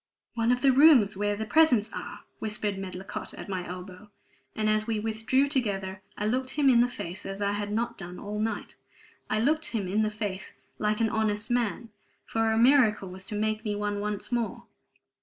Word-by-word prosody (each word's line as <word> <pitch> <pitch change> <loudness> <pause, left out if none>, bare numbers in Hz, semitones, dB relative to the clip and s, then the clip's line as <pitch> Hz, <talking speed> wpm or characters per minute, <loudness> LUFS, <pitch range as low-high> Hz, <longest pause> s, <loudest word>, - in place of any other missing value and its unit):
"One 230 0 +1
of 250 +1 0
the 270 - +6
rooms 260 -7 +6
where 205 +1 0
the 220 +1 -4
presents 245 -4 +4
are!" - - -7 0.2
whispered 210 -1 -2
Medlicott 190 0 -6
at - - -8
my 185 -2 -3
elbow. 185 +3 -9 0.5
And 215 0 0
as 215 +1 +1
we 225 -2 0
withdrew 225 +5 +1
together, 200 -9 -2 0.2
I 210 - -2
looked 255 +4 0
him 280 -3 +5
in 235 - +5
the 240 - +5
face 185 -5 -6
as 195 0 -5
I 200 0 +1
had 205 0 -3
not 230 +3 -2
done 180 -1 -7
all 210 +1 -5
night. 225 +1 -2 0.6
I 215 - +1
looked 310 +7 +2
him 210 -5 -2
in 205 +4 +1
the 215 - +2
face 210 -3 -5 0.2
like 210 +1 0
an 225 - +3
honest 215 0 -1
man, 235 -1 0 0.4
for 225 0 0
a 220 - +1
miracle 230 -5 +4
was 190 +1 -8
to 215 - -3
make 215 +1 -1
me 210 -2 -2
one 205 0 -2
once 210 +2 -2
more. 240 -2 -2
215 Hz, 200 wpm, -28 LUFS, 205-235 Hz, 0.6 s, the